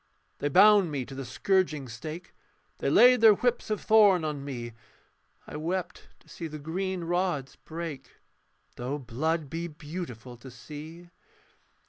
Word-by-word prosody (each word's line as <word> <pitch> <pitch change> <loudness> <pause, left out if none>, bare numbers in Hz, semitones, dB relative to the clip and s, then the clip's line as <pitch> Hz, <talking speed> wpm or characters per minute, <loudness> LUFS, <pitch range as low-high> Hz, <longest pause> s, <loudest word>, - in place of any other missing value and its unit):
They 145 - -1
bound 205 +3 +6
me 140 -4 -3
to 135 - -10
the 135 0 -5
scourging 155 +1 0
stake, 155 +9 -8 0.5
They - - 0
laid 250 -1 +6
their 220 -2 +8
whips 245 +2 -1
of 215 - -1
thorn 205 -6 +5
on 150 -2 -3
me; 120 -4 -6 0.7
I - - -7
wept 180 +3 -4
to - - -25
see 165 - -7
the 155 -1 -7
green 180 +4 -3
rods 175 -5 -1
break, 165 -3 -8 0.6
Though 125 +4 -3
blood 150 +5 -2
be 165 +4 -4
beautiful 150 -6 -8
to 130 +3 -12
see. 155 +7 -11
160 Hz, 145 wpm, -28 LUFS, 140-185 Hz, 0.7 s, their